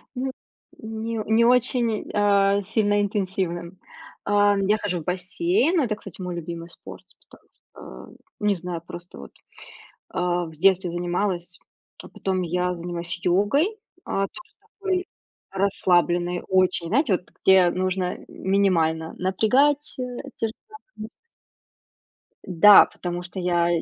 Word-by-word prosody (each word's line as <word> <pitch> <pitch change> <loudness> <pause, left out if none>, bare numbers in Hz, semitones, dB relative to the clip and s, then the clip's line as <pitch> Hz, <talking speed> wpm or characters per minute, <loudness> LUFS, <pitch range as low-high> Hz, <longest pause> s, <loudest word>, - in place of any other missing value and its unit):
М, 260 +1 -2 0.5
не 220 0 -4
не 225 +2 +3
очень, 240 -2 +1
а, 200 -1 +3
сильно 205 0 +1
интенсивным. 185 -3 -3 0.5
А, 205 0 +3
я 205 +2 +2
хожу 190 -4 -3
в - - -11
бассейн, 340 - 0
ну 300 - +3
это, 215 -3 -1
кстати, 195 -3 -12
мой 180 -1 -4
любимый 170 0 -7
спорт, - - -13 0.2
потом - - -20
что. 65 0 -14 0.3
Не 205 -1 +2
знаю, 175 -1 -6
просто 175 - -10
вот, 70 - -11 0.8
а, 175 -1 -1
в 160 - -9
детстве 185 +1 +2
занималась, 175 0 -2 0.4
а - - -12
потом 190 -1 -2
я 180 +1 -1
занимаюсь 170 0 -5
йогой, 275 - +2 0.3
а, 195 0 -1
тоже 350 -1 -14 0.3
такой 375 -2 -1 0.5
расслабленной 180 -2 +1
очень, 185 -2 +2
знаете, 235 - +2
вот 180 - -1 0.2
где 190 -2 +6
нужно 185 0 -2
минимально 165 -5 0
напрягать, 260 +10 +1
э, - - -1 0.3
те 225 - 0
же 220 - -8
самые 435 0 -12 0.2
мышцы. 215 +1 -7 1.4
Да, 195 +3 +8
потому 175 0 -6
что 180 +2 -8
я 175 -1 +1
190 Hz, 135 wpm, -24 LUFS, 175-215 Hz, 1.4 s, Да